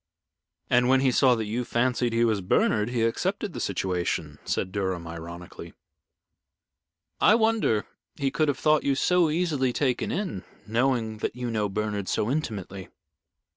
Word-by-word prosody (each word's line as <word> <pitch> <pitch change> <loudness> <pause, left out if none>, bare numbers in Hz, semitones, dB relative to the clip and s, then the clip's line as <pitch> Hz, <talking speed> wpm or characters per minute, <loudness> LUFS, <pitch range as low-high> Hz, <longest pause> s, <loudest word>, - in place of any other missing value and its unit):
"And 125 0 +3
when 130 0 +4
he 135 -1 +3
saw 125 0 +4
that 110 -1 -3
you 115 +4 -2
fancied 120 0 0
he 115 +1 +2
was 110 -3 +1
Bernard, 105 +4 +2
he 120 -2 0
accepted 190 - -1
the - - -5
situation," 90 -6 -2
said 95 - -2
Durham, 95 -3 -2
ironically. 85 +1 -9 1.4
"I 215 - +6
wonder 220 - +2 0.3
he 140 -2 -1
could 155 +2 +1
have 140 -3 0
thought 155 0 +3
you 140 - +1
so 175 +3 +3
easily 150 -6 0
taken 130 0 0
in, 180 - -3 0.2
knowing 115 -1 0
that - - -3
you 125 -1 -3
knew 105 -2 0
Bernard 105 -1 -2
so 110 - 0
intimately." 100 - -4
120 Hz, 155 wpm, -26 LUFS, 100-135 Hz, 1.4 s, I